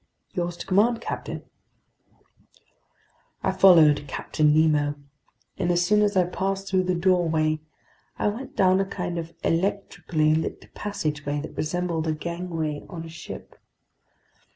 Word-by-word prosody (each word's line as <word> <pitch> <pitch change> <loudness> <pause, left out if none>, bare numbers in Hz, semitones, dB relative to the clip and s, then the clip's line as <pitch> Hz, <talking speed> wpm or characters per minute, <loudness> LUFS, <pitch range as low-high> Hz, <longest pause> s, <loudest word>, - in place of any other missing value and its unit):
"Yours 175 -1 -2
to - - -7
command, 225 +5 +3
captain." - - -5 2.0
I - - +2
followed 155 -6 +6
Captain 150 +3 +1
Nemo, 150 -2 +3 0.6
and 175 -2 0
as 175 0 +2
soon 210 +3 +4
as 205 -2 +2
I 185 - +6
passed 195 +2 -2
through 185 -1 +1
the 180 0 +1
doorway, 165 -4 +2 0.6
I - - +1
went 240 +6 -7
down 185 0 +4
a 195 - +1
kind 180 -3 -4
of 165 0 -7
electrically 165 -3 0
lit 160 0 -3
passageway 150 -7 -3
that 155 - -8
resembled 165 0 -1
a 155 - +1
gangway 165 -2 -4
on 165 -3 -7
a - - -9
ship. 165 - -10
175 Hz, 135 wpm, -25 LUFS, 155-190 Hz, 2.0 s, followed